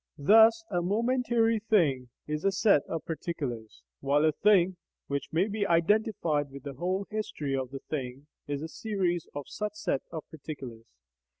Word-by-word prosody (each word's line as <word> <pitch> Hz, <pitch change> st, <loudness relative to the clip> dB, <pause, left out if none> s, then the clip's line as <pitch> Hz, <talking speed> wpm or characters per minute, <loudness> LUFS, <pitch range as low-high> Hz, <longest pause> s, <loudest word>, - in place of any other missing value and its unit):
Thus 220 Hz, +8 st, +6 dB
a 175 Hz, -2 st, +1 dB
momentary 230 Hz, +3 st, +1 dB
thing 155 Hz, -, +2 dB, 0.2 s
is 150 Hz, 0 st, -3 dB
a 195 Hz, -, +3 dB
set 195 Hz, -5 st, +4 dB
of 165 Hz, -, -4 dB
particulars, 125 Hz, -, -5 dB, 0.2 s
while 145 Hz, -, +2 dB
a 155 Hz, -, +4 dB
thing 185 Hz, +1 st, +3 dB, 0.3 s
(which 140 Hz, 0 st, -4 dB
may 175 Hz, +5 st, +2 dB
be 210 Hz, 0 st, -2 dB
identified 170 Hz, -4 st, +2 dB
with 140 Hz, 0 st, -10 dB
the 140 Hz, -1 st, -6 dB
whole 185 Hz, +7 st, -2 dB
history 155 Hz, -10 st, -3 dB
of 130 Hz, -2 st, -2 dB
the 135 Hz, 0 st, -7 dB
thing) 135 Hz, -2 st, -5 dB, 0.2 s
is 145 Hz, 0 st, -3 dB
a -, -, -3 dB
series 180 Hz, -3 st, -2 dB
of 145 Hz, -1 st, -5 dB
such 210 Hz, 0 st, -4 dB
sets 140 Hz, -9 st, -2 dB
of 160 Hz, -3 st, -6 dB
particulars. 130 Hz, -7 st, -8 dB
165 Hz, 165 wpm, -29 LUFS, 140-210 Hz, 0.3 s, Thus